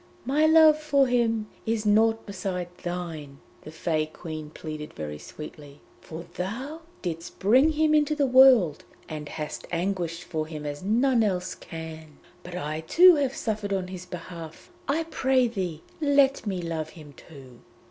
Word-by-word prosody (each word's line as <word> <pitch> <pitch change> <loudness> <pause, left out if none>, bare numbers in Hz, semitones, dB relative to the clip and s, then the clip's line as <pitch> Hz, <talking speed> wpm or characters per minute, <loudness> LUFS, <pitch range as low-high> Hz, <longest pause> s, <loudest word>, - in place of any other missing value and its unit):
'My 295 +5 +3
love 315 -1 +7
for 285 -3 +3
him 230 -3 +1 0.2
is 220 -1 -1
nought 225 +2 +3
beside 180 -3 -4
thine,' 165 -6 -5 0.2
the - - -10
Fée 155 -1 -2
Queen 155 -3 -7
pleaded 155 -1 -8
very 75 -1 -6
sweetly, 150 - -10 0.2
'for 165 +2 -9
thou 250 - -5 0.2
didst 165 -2 -5
bring 255 +11 +4
him 310 0 +2
into 300 0 +3
the 290 -2 +2
world, 255 - +6 0.2
and 150 -1 -6
hast 150 -1 -6
anguished 175 -1 -2
for 155 -3 -3
him 155 -2 -7
as 145 0 -5
none 235 +5 +2
else 185 -3 -1
can. 160 -2 -9 0.2
But 180 0 -9
I 155 -3 -3
too 350 - +7
have 275 -2 0
suffered 210 -3 -2
on 185 -2 -2
his 185 -1 -8
behalf; 170 - -9 0.2
I 310 +4 +1
pray 265 -5 +2
thee, 185 -8 -4 0.2
let 280 -5 +3
me 185 -3 -2
love 160 -2 -3
him 150 -3 -12
too!' 130 -6 -14
180 Hz, 160 wpm, -26 LUFS, 160-255 Hz, 0.2 s, love